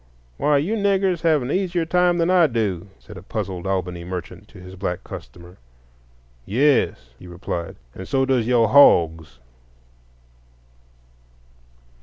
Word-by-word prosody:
"Why, 150 -1 +2
you 160 +10 -1
niggers 195 -4 0
have 155 -5 +2
an 125 - -4
easier 180 -3 -1
time 180 +1 +2
than 170 +1 +1
I 175 -3 +5
do," 105 - -2
said 105 - -13
a - - -10
puzzled 95 -2 -5
Albany 90 -2 -3
merchant 90 0 -8
to - - -16
his 90 +1 -11
black 90 -1 -4
customer. 85 +7 -11 0.9
"Yes," 115 - +1
he 90 - -13
replied, 85 -1 -6 0.2
"and 95 - -9
so 135 -1 +1
does 130 -4 0
yo' 120 -2 +3
hogs." 80 - +4
110 Hz, 135 wpm, -21 LUFS, -, 0.9 s, I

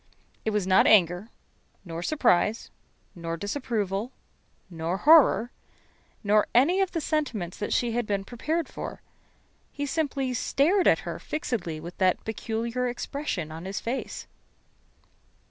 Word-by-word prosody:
It - - +2
was 210 -3 0
not 190 0 +5
anger, 180 0 +4 0.6
nor 165 -1 -5
surprise, 225 - +1 0.4
nor 165 -1 -5
disapproval, 205 - -2 0.6
nor 170 0 -3
horror, 290 -3 +6 0.7
nor 210 0 +3
any 335 +11 +5
of 385 - 0
the 335 - 0
sentiments 285 - -2
that 205 - -3
she 240 -1 +1
had 235 -1 -1
been 200 -1 -1
prepared 305 +8 -2
for. - - -7 0.7
He 285 - -4
simply 275 -3 -1
stared 310 - +2
at - - +4
her - - -5
fixedly 190 - -3
with 170 +3 -9
that 185 -1 +2
peculiar 230 +3 -2
expression 240 - -4
on 165 +3 -8
his 195 +1 -3
face. 245 +3 -4
225 Hz, 130 wpm, -27 LUFS, 185-275 Hz, 0.7 s, horror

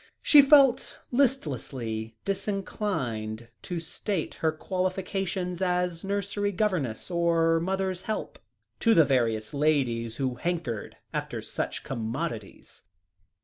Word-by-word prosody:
She 295 - +9
felt 275 -3 +5
listlessly 130 - -1
disinclined 165 - -2
to 175 -2 -4
state 165 +2 -3
her 160 - +3
qualifications 185 +1 -2
as 180 -2 0
nursery 200 +1 -1
governess, 180 - -1
or 165 -1 +3
mother's 190 +1 -1
help, 215 - -4 0.4
to 230 -1 +4
the 165 -3 +7
various 115 -3 +1
ladies 130 -6 +1
who 130 -2 -2
hankered 160 -9 -3 0.2
after - - -3
such - - -4
commodities. 115 - -5
170 Hz, 105 wpm, -28 LUFS, 125-195 Hz, 0.4 s, She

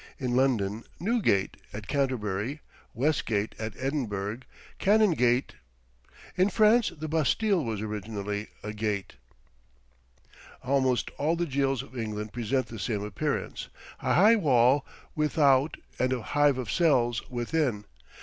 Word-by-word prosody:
In 125 -2 -2
London, 115 -5 +1 0.2
Newgate; 185 - +1 0.2
at 105 0 -7
Canterbury, 130 -1 -1 0.3
Westgate; 115 -6 0
at 110 -1 -4
Edinburgh, 115 -6 -2 0.4
Canongate. 165 - +3 0.8
In 185 +2 +3
France 220 +2 +4
the 155 +1 -5
Bastile 165 +5 +1
was 110 -4 -3
originally 105 -1 -4 0.2
a 105 +1 -5
gate. 105 -2 -2 1.5
Almost 130 -2 +1
all 155 +4 +2
the 175 +1 -1
jails 135 -3 0
of 135 - -15
England 110 -2 -4
present 120 +3 0
the 115 - -9
same 105 0 -2
appearance 135 +8 -3 0.3
a - - +1
high 215 +5 +6
wall 130 - +3 0.3
without 145 -2 +3 0.2
and 130 0 +1
a 125 -3 -3
hive 145 +3 +2
of 125 -4 -3
cells 125 -9 +2
within. 120 -3 -1
130 Hz, 120 wpm, -28 LUFS, 110-150 Hz, 1.5 s, high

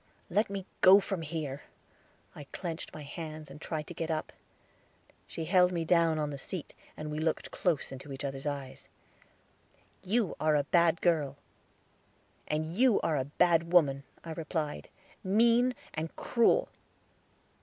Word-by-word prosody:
"Let 210 +4 +2
me 195 -2 -4 0.2
go 190 +2 +9
from 195 -3 -3
here." 150 -3 -4 0.7
I 145 - -9
clenched 165 +2 -6
my 155 - -8
hands, 155 +1 -7
and 150 - -11
tried 155 -2 -3
to 175 - -8
get 165 -1 -4
up. 155 -1 -2 0.9
She 165 - -5
held 180 +1 +4
me 170 -2 -2
down 165 -2 +3
on 150 -1 -1
the 140 - -6
seat, 170 +4 -7 0.2
and 155 0 -5
we 150 - -3
looked 160 0 -1
close 170 -6 0
in 135 +2 -9
each 135 +1 -5
other's 135 +1 -4
eyes. 140 -2 -6 1.1
"You 210 -1 0
are 155 -1 +3
a 145 - +3
bad 170 +2 +3
girl." 150 -6 +1 1.1
"And 155 +1 -2
you 240 +2 +4
are 160 - +1
a 130 - 0
bad 170 +3 +2
woman," 140 -6 +5 0.2
I 165 - -7
replied; 155 - -3 0.3
"mean 235 +5 +4 0.2
and 160 +1 -4
cruel." 245 - +2
160 Hz, 155 wpm, -31 LUFS, 150-180 Hz, 1.1 s, go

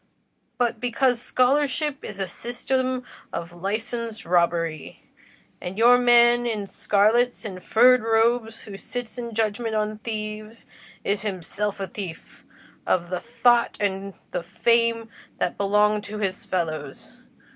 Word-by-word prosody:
but 240 -2 0
because 245 0 +1
scholarship 280 +3 +1
is 210 - -7
a 195 -1 -2
system 255 +4 -2 0.3
of 170 0 -5
licenced 220 +4 -4
robbery, 170 -3 0 0.6
and 180 +2 -6
your 240 +2 +7
man 240 0 +5
in 215 -3 -2
scarlet 220 +6 +2
and 185 -3 -7
furred 250 +2 +5
robe 225 +1 +2
who 210 -3 -10
sits 245 +3 -6
in 235 -2 -6
judgment 225 +1 -1
on 215 0 -1
thieves, 215 0 -6 0.4
is 200 0 0
himself 205 +1 -3
a 195 - -2
thief 185 -3 -9 0.4
of 175 -1 +1
the 180 - -1
thoughts 240 +2 +2
and 195 -1 -2 0.2
the - - -2
fame 230 +5 +1 0.3
that 180 - -1
belong 210 +1 +2
to 210 +1 -7
his 195 -2 -3
fellows. 155 -6 -4
215 Hz, 130 wpm, -24 LUFS, 195-240 Hz, 0.6 s, your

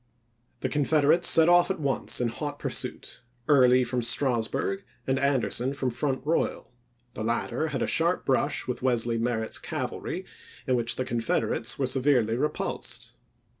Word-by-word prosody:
The - - 0
Confederates 150 +3 +3
set 160 0 +7
off 175 +1 +5
at 190 - -2
once 140 -3 0
in 120 -1 0
hot 145 +4 -5
pursuit, - - -3 0.3
on 150 - +5
condSS 140 - +5
Early 125 0 +5
from 125 0 -2
Strasburg 130 - 0 0.2
and 130 0 0
Anderson 135 -1 0
from 130 -2 -2
Front 130 +2 -2
oti865j6.ar' 150 - -1
Royal; - - -1 0.4
the 110 - -5
latter 120 +5 -1
had 140 -5 -2
a - - +1
sharp 170 +2 0
brush 130 -1 +1
with 125 -1 -4
Wesley 120 -2 +1
Merritt's 115 -1 -1
cavalry, - - -5 0.4
in 130 - +1
which 120 -1 0
the 130 - -3
Confederates 115 -2 -1
were 135 - 0
severely 130 -3 +2
repulsed. 150 +5 -3
130 Hz, 165 wpm, -27 LUFS, 120-145 Hz, 0.4 s, set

